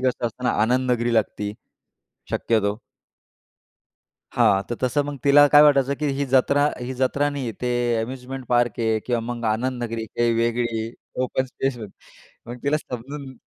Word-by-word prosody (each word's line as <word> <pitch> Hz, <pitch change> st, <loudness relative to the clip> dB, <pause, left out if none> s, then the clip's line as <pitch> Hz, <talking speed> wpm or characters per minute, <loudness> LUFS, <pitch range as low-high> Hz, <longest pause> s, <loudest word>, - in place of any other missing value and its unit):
कसं 125 Hz, -2 st, 0 dB
असतं 120 Hz, +2 st, -7 dB
ना, -, -, +3 dB
आनंदनगरी 120 Hz, 0 st, +1 dB
लागती, 105 Hz, -2 st, 0 dB, 0.8 s
शक्यतो. 105 Hz, -2 st, 0 dB, 1.5 s
हां, 95 Hz, 0 st, +3 dB
तर 120 Hz, -, -2 dB
तसं 130 Hz, +3 st, +1 dB
मग 145 Hz, -1 st, -5 dB
तिला 145 Hz, +1 st, +7 dB
काय 145 Hz, +1 st, +7 dB
वाटायचं 140 Hz, -2 st, +4 dB
की 150 Hz, -, -1 dB
ही 140 Hz, -, +1 dB
जत्रा, 135 Hz, +2 st, +3 dB
ही 125 Hz, +1 st, -5 dB
जत्रा 140 Hz, +3 st, +1 dB
नाही. 135 Hz, -5 st, -4 dB
ते 125 Hz, 0 st, 0 dB, 0.3 s
अम्युजमेंट 130 Hz, +2 st, -6 dB
पार्क 120 Hz, -2 st, +1 dB
आहे 110 Hz, -1 st, +1 dB
किंवा 120 Hz, -2 st, 0 dB
मग 120 Hz, -1 st, -8 dB
आनंदनगरी 115 Hz, -1 st, -3 dB
काही 120 Hz, +2 st, 0 dB
वेगळी 115 Hz, -1 st, -1 dB, 0.3 s
ओपन 130 Hz, +1 st, -1 dB
स्पेस 130 Hz, 0 st, -3 dB, 0.7 s
मग 120 Hz, -, -6 dB
तिला 145 Hz, +2 st, +2 dB
समजून. 135 Hz, +1 st, -8 dB
125 Hz, 145 wpm, -23 LUFS, 115-135 Hz, 1.5 s, तिला